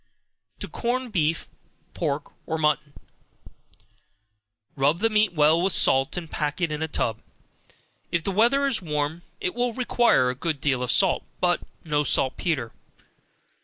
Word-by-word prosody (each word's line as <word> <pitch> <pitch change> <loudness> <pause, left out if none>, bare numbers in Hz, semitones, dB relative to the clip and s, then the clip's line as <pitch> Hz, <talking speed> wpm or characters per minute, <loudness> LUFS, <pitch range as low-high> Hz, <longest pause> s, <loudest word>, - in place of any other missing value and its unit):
To - - -3
Corn 250 0 -2
Beef, 165 -4 0 0.5
Pork 145 -3 -3 0.2
or 160 - -1
Mutton. 150 -1 0 1.8
Rub 145 +4 +2
the 225 +5 +1
meat 215 -2 +3
well 155 +1 +4
with 190 0 +1
salt, 135 +5 +3
and 170 -2 -4
pack 150 0 -3
it 170 -3 0
in 150 0 -3
a 160 - 0
tub. 115 -7 -1 0.9
If 170 -2 0
the 195 - -1
weather 240 +8 +3
is 250 -6 +1
warm, 150 0 -2 0.2
it 180 - -2
will 245 0 -1
require 240 - +2
a - - -7
good 155 +2 -2
deal 130 -3 0
of 125 - -1
salt, - - +2 0.2
but - - +2 0.2
no 150 -2 0
saltpetre. 130 -2 0
160 Hz, 150 wpm, -25 LUFS, 145-205 Hz, 1.8 s, well